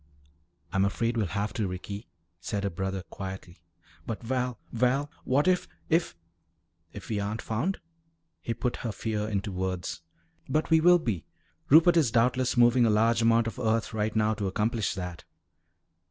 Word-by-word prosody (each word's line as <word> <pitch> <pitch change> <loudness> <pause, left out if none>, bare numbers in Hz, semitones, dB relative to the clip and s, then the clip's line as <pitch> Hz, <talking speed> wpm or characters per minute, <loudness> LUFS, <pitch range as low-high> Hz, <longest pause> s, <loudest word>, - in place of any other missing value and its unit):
"I'm 95 -1 +3
afraid 115 +4 0
we'll 110 -4 0
have 100 +3 -2
to, 105 -4 -1
Ricky," 100 +4 -6 0.3
said 100 +2 -3
her 100 - -1
brother 95 +2 -3
quietly. 95 -3 -8 0.5
"But, 115 +1 -4
Val 125 0 -2
Val, 130 +5 +1
what 140 +5 +2
if 180 -1 +2 0.2
if 165 - +1 0.4
" - - -48 0.3
"If 100 - -10
we 105 -2 -1
aren't 105 +2 -3
found?" 130 - -1 0.6
he 115 - -3
put 120 +2 -2
her 115 - -3
fear 105 +1 -3
into 100 -1 -2
words. 90 -3 -3 0.5
"But 155 +4 0
we 160 0 +6
will 175 +2 +7
be. 115 - -3 0.4
Rupert 165 +4 +7
is 150 -7 +4
doubtless 125 +2 +2
moving 120 0 +5
a - - +3
large 115 +2 +3
amount 115 0 +4
of 115 +2 -5
earth 115 -2 0
right 110 0 -1
now 110 0 +2
to 105 -2 -2
accomplish 110 +3 0
that." 90 -2 -6
110 Hz, 170 wpm, -28 LUFS, 100-125 Hz, 0.6 s, will